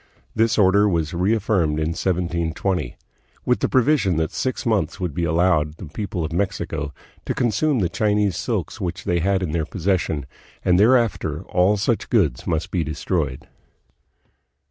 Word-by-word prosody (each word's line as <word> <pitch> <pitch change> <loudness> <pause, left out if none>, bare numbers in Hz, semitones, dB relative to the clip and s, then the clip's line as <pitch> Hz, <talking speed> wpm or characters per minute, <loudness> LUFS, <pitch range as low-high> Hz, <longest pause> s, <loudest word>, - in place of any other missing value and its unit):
This 115 0 +2
order 100 +1 +4
was 85 -2 -1
reaffirmed 90 -4 +1
in 80 0 0
1720" 85 -3 -1 0.5
with - - +2
the - - 0
provision 125 - +2
that 80 -1 0
six 130 0 -2
months 105 -8 0
would 90 -5 -2
be 85 +3 -1
allowed 80 -3 +2
the 95 - -8
people 90 +1 -4
of 80 - -5
Mexico 85 -5 -2 0.4
to - - -1
consume 125 +5 +1
the 90 - +2
Chinese 105 +1 +1
silks - - -3
which 90 +3 -3
they 85 -1 0
had 95 +2 +1
in 85 - -2
their 80 0 0
possession, 85 -4 -1 0.4
and 90 0 +4
thereafter 100 - +2
all 95 +3 +2
such 110 +3 -1
goods 85 - +1
must 80 0 -1
be 90 -3 0
destroyed. 75 -3 -3
90 Hz, 155 wpm, -22 LUFS, 80-105 Hz, 0.5 s, order